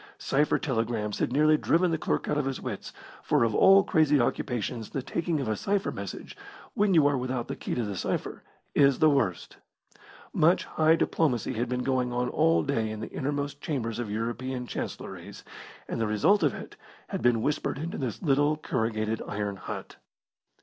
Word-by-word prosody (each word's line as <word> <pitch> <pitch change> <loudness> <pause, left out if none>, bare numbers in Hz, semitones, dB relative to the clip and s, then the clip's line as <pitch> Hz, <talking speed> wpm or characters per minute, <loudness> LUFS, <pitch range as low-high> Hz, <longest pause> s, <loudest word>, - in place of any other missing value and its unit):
Cipher 145 +2 +1
telegrams 115 -6 -2
had - - 0
nearly 155 +3 +4
driven 175 +3 +2
the 160 - +1
clerk - - -1
out - - 0
of 145 - -1
his 135 -1 -2
wits, - - -6 0.3
for - - +2
of 115 -2 +1
all 195 - +7
crazy 150 -4 +3
occupations 120 -1 -2
the 135 - -4
taking 165 +2 -1
of 135 - -3
a 110 - 0
cipher 195 - -1
message, 100 -2 -7 0.4
when 200 -2 +2
you 155 -3 +6
are 145 0 +3
without 125 -1 -3
the - - -4
key - - -4
to 120 - -1
the 105 -2 -4
cipher, - - -3 0.3
is 140 -2 +4
the 155 -1 +5
worst. 95 -11 -1 0.8
Much 170 +4 +3
high 160 +1 +3
diplomacy 145 -7 0
had 120 +2 -2
been 125 0 -1
going 130 -2 0
on 125 0 -1
all 165 +4 +3
day 115 -6 -1
in 110 0 -5
the 110 - -6
innermost 145 +1 -3
chambers 120 -8 -3
of 120 -3 -3
European 120 +4 -3
chancellories, - - -7 0.4
and - - -3
the 110 - +1
results 110 - +3
of 145 - +2
it - - -10 0.3
had - - -3
been 115 -1 +3
whispered 150 -1 -1
into 160 +4 -4
this 125 -5 -4
little 145 0 +2
corrugated 110 -5 -1
iron 105 -1 -3
hut. 95 - -7
130 Hz, 185 wpm, -28 LUFS, 115-150 Hz, 0.8 s, all